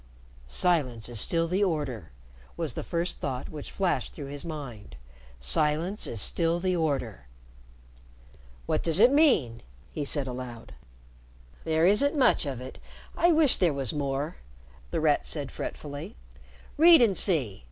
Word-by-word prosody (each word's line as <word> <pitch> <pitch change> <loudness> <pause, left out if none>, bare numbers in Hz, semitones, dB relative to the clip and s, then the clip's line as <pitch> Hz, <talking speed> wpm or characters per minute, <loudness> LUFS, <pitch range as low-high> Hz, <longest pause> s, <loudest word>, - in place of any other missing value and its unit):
"Silence 130 - 0
is 120 -3 -3
still 165 +8 +1
the 185 +4 +1
order," 140 - -2 0.5
was 160 -7 -3
the - - -4
first 170 +1 -3
thought 130 -3 -4
which 150 -2 -8
flashed 190 -3 -1
through 145 - -7
his 140 +1 -7
mind. 140 - -8 0.4
"Silence 150 - 0
is 115 - -4
still 165 - +1
the 185 0 0
order." 135 - -2 1.4
"What - - 0
does 165 +2 +2
it 240 +4 +7
mean?" 250 - +3 0.3
he 150 - -4
said 140 0 +1
aloud. 125 -2 -7 0.9
"There 160 0 +2
isn't 280 - +3
much 255 - +3
of 135 -4 -4
it. 130 +1 -9 0.4
I 345 - +4
wish 310 -4 +4
there 175 -5 +2
was 135 -4 -2
more," 145 +2 -3 0.5
The 165 - -2
Rat 150 -2 +2
said 145 -4 -3
fretfully. 150 +8 -7 0.6
"Read 330 0 +8
and 220 -5 +3
see. 140 - +1
150 Hz, 145 wpm, -27 LUFS, 130-180 Hz, 1.4 s, Read